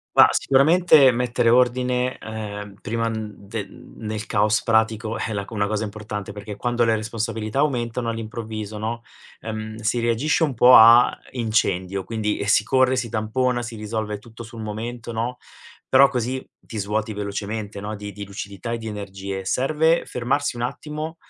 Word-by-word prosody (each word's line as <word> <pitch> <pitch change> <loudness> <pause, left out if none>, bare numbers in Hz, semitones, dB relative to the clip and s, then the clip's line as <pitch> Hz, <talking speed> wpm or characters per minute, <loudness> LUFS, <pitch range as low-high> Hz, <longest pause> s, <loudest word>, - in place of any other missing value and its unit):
Ma, - - +9
sicuramente 150 0 +5
mettere 120 0 +1
ordine, 125 +1 +2
ehm, 105 -2 -7
prima, 115 +1 -1
mhmm, 110 -1 -4
de 100 +1 -6
mhmm, - - -15
nel 110 +1 -4
caos 105 0 +2
pratico 110 0 +1
è 110 0 -3
la 100 -1 -2
c - - -15
una 100 -2 0
cosa 110 +1 -1
importante, 105 -1 -6
perché 105 0 -8
quando 120 +1 0
le 115 -1 +3
responsabilità 110 +2 -3
aumentano 120 -4 -1
all'improvviso, 110 -2 -5
no, 115 +2 -3 0.4
ehm, 110 0 -5
si 115 +2 0
reagisce 120 +8 +1
un 150 -5 +1
po' 125 +2 +7
a 115 +2 +8 0.2
incendio, 100 -5 0
quindi 105 -1 -2
si 105 - +4
corre, 130 +2 +3
si 120 -2 -2
tampona, 120 +3 0
si 120 -1 -6
risolve 105 0 -3
tutto 115 +2 -12
sul 115 0 -10
momento, 115 +3 -5
no, 115 +3 -2 0.5
però 135 +1 +7
così 130 0 -3
ti 110 - -8
svuoti 105 +2 -2
velocemente, 105 +1 -4
no, 105 +2 -5
di 105 0 -7
di 100 0 -7
lucidità 100 +2 -6
e 120 - -2
di 110 -1 -6
energie. 95 -2 -6
Serve 155 - +2
fermarsi 125 +2 -1
un 120 - -4
attimo 150 +5 -4
110 Hz, 165 wpm, -23 LUFS, 105-120 Hz, 0.5 s, Ma